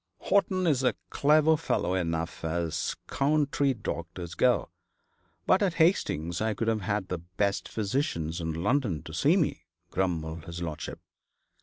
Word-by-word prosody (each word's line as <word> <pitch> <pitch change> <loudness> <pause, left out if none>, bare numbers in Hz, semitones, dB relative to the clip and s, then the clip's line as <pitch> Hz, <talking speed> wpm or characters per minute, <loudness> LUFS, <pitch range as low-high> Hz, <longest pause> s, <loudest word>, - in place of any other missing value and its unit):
'Horton 185 -2 +1
is 145 -6 +3
a 125 - +2 0.2
clever 155 +2 +4
fellow 150 - 0
enough, 85 -2 -2
as 80 0 -1
country 140 -1 +1
doctors 85 -4 -5
go; 125 -1 +2 0.8
but 185 - +4
at 190 -5 +1
Hastings 90 - +2
I 110 -1 0
could 115 - -2
have 110 -1 0
had 100 0 -2
the 90 - -2
best 95 +4 -2
physicians 100 - -1
in 80 0 -2
London 100 - 0
to - - -9
see - - +3
me,' - - 0 0.3
grumbled 80 -4 -2
his 85 0 -6
lordship. 80 -3 -5
100 Hz, 145 wpm, -28 LUFS, 85-140 Hz, 0.8 s, clever